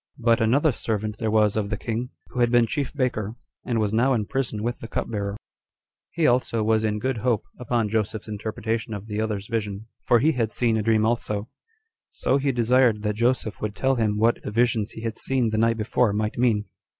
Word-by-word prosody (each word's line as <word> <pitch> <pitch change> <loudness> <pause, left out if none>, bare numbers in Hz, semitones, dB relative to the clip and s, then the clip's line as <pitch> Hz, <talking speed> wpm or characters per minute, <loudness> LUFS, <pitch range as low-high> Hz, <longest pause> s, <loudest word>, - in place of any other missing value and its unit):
3. - - -15
But 115 -1 +4
another 140 +8 +3
servant 110 -2 -3
there 110 - 0
was 105 -1 +3
of 105 -2 -1
the 105 - -2
king, 115 +4 -3 0.2
who 125 - -5
had 120 -1 +4
been 120 -1 +4
chief 135 +3 -2
baker, 120 -6 -2 0.3
and 120 -3 -1
was 105 -1 0
now 120 +4 +3
bound 125 -5 +2
in - - -4
prison 115 -4 -2
with 120 +1 -2
the 115 - -7
cupbearer; 100 -3 -3 0.7
he 170 -2 0
also 120 -3 +2
was 110 0 +2
in 105 -1 0
good 130 +3 -1
hope, 110 -1 0 0.2
upon 120 -2 0
Joseph's 110 0 -2
interpretation 110 +1 -3
of 100 0 -7
the 105 -1 -3
other's 105 -3 -2
vision, 105 -2 -3 0.2
for 120 - +4
he 150 +8 +3
had 115 -6 -1
seen 115 -1 +1
a 110 - +1
dream 110 0 +2
also; 110 -2 -1 0.6
so 135 - +1
he 140 0 +1
desired 120 -2 +3
that 105 0 0
Joseph 115 -3 0
would 105 -1 -3
tell 135 +4 +2
him 110 -4 0
what 115 +2 +2
the - - -5
visions 115 -1 +1
he 110 - -8
had 115 -1 -3
seen 130 -4 +1
the 110 - 0
night 115 0 +2
before 110 0 +1
might 105 +1 -1
mean. 115 -4 +2
110 Hz, 220 wpm, -24 LUFS, 105-120 Hz, 0.7 s, But